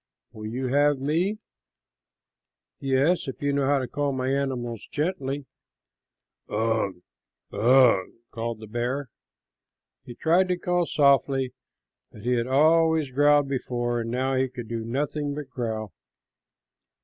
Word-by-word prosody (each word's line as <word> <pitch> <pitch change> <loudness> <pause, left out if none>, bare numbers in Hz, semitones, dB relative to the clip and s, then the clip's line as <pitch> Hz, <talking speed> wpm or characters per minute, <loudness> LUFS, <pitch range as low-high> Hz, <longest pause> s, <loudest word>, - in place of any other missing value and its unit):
"Will 110 -2 -8
you 125 +4 -3
have 145 +2 +3
me?" 165 +10 0 1.4
"Yes, 140 +6 +1
if 135 - -6
you 145 0 0
know 140 -1 +1
how 145 0 +3
to 130 -2 -2
call 145 +1 -1
my 130 -1 -2
animals 130 -5 -2
gently." 145 -4 -2 1.0
"Ugh, 110 -2 0 0.6
ugh," 120 -2 +5 0.2
called 115 -1 -4
the - - -7
bear. 120 +5 -3 0.9
He 120 - -10
tried 175 +7 +3
to 180 -1 0
call 175 -1 0
softly, 135 -2 +2 0.6
but 105 - -13
he 125 - 0
had 120 -1 +1
always 160 +1 +3
growled 145 +1 +4
before, 120 -3 -2
and 115 - -4
now 130 +3 0
he 130 0 +1
could 125 -2 -8
do 115 0 -4
nothing 145 +4 -2
but 145 -3 -7
growl. 110 -5 -4
135 Hz, 135 wpm, -26 LUFS, 120-145 Hz, 1.4 s, ugh